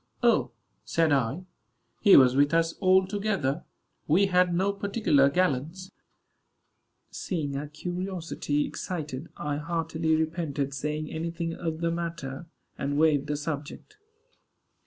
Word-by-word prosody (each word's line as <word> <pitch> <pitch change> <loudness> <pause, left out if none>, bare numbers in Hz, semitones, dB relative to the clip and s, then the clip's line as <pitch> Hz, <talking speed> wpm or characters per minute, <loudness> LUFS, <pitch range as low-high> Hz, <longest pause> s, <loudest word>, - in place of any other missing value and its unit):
"O," - - +3 0.3
said 165 -2 +1
I, 135 +6 0 0.5
"he 200 - +7
was 130 -1 +6
with 145 +3 +3
us 165 0 +2
all 190 -1 +4
together. 195 -7 -1 0.4
We 180 +7 +4
had 180 -2 +3
no 190 +3 +1
particular 200 -9 +2
gallants." 180 +3 -1 1.2
Seeing 155 -7 -3
her 140 +2 -4
curiosity 170 -2 -3
excited, 155 -2 -5
I 145 -1 -2
heartily 160 0 -1
repented 155 -4 -2
saying 150 +2 -3
any 160 +1 -3
thing 165 0 -3
of 165 -1 -4
the 170 0 +1
matter, 165 -3 -5 0.3
and 145 +1 -1
waived 150 -2 +3
the 150 0 -1
subject. 150 - -6
160 Hz, 125 wpm, -27 LUFS, 145-180 Hz, 1.2 s, he